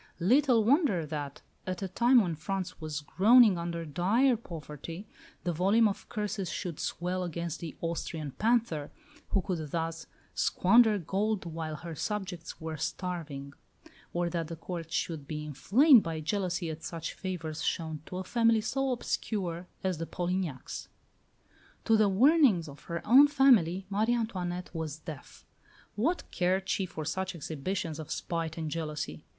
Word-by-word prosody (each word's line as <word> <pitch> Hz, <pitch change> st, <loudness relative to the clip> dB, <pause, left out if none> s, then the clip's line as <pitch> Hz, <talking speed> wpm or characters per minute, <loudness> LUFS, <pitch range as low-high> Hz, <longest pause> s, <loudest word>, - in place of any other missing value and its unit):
Little 245 Hz, -, +4 dB
wonder 230 Hz, -, +3 dB
that, 145 Hz, -2 st, -5 dB, 0.2 s
at 185 Hz, +1 st, -3 dB
a -, -, -1 dB
time 240 Hz, +6 st, +5 dB
when 175 Hz, -5 st, -1 dB
France 180 Hz, +3 st, -4 dB
was 155 Hz, -2 st, -4 dB
groaning 210 Hz, -, +6 dB
under 170 Hz, 0 st, -3 dB
dire 205 Hz, -, +3 dB
poverty, 165 Hz, -1 st, -8 dB, 0.4 s
the 175 Hz, -, 0 dB
volume 200 Hz, +7 st, +4 dB
of 200 Hz, -, -5 dB
curses 210 Hz, -3 st, -3 dB
should 175 Hz, -6 st, -4 dB
swell 180 Hz, +1 st, -2 dB
against 170 Hz, -1 st, -4 dB
the 165 Hz, -2 st, -6 dB
"Austrian 165 Hz, -3 st, -3 dB
panther," 215 Hz, -, +1 dB, 0.4 s
who 195 Hz, -, +1 dB
could 165 Hz, -6 st, -3 dB
thus 165 Hz, +1 st, -3 dB, 0.3 s
squander 220 Hz, +3 st, +4 dB
gold 200 Hz, +3 st, -1 dB
while 160 Hz, -2 st, -4 dB
her 165 Hz, +2 st, -7 dB
subjects 180 Hz, -2 st, -4 dB
were 160 Hz, -1 st, -5 dB
starving; 150 Hz, -5 st, -4 dB, 0.6 s
or 175 Hz, 0 st, 0 dB
that 165 Hz, -2 st, -2 dB
the 165 Hz, -, -6 dB
Court 165 Hz, 0 st, -6 dB
should 160 Hz, -3 st, -2 dB
be 150 Hz, 0 st, -4 dB
inflamed 235 Hz, -, +5 dB
by 165 Hz, -3 st, -4 dB
jealousy 175 Hz, 0 st, -1 dB
at 155 Hz, +1 st, -8 dB
such 165 Hz, -1 st, -5 dB
favours 165 Hz, -5 st, -5 dB
shown 160 Hz, -2 st, -2 dB
to 180 Hz, -, -5 dB
a 185 Hz, -, -3 dB
family 230 Hz, +2 st, +3 dB
so 270 Hz, +5 st, -1 dB
obscure 185 Hz, -7 st, -2 dB, 0.2 s
as 185 Hz, -4 st, -1 dB
the 165 Hz, -, -3 dB
Polignacs. 175 Hz, -6 st, -3 dB, 1.0 s
To 225 Hz, -, +5 dB
the 215 Hz, -2 st, +4 dB
warnings 235 Hz, -, +5 dB
of 140 Hz, -2 st, -12 dB
her 170 Hz, 0 st, -5 dB
own 270 Hz, +6 st, +8 dB
family 230 Hz, -, +4 dB
Marie 215 Hz, +4 st, +1 dB
Antoinette 180 Hz, -6 st, -3 dB
was 160 Hz, -3 st, -4 dB
deaf. 155 Hz, -2 st, -10 dB, 0.5 s
What 315 Hz, -, 0 dB
cared 185 Hz, +1 st, +1 dB
she 190 Hz, -, 0 dB
for 155 Hz, -3 st, -6 dB
such 190 Hz, +4 st, -2 dB
exhibitions 160 Hz, +2 st, -3 dB
of 155 Hz, -, -7 dB
spite 165 Hz, -1 st, -3 dB
and 160 Hz, -2 st, -3 dB
jealousy? 155 Hz, -2 st, -4 dB
175 Hz, 155 wpm, -30 LUFS, 160-210 Hz, 1.0 s, own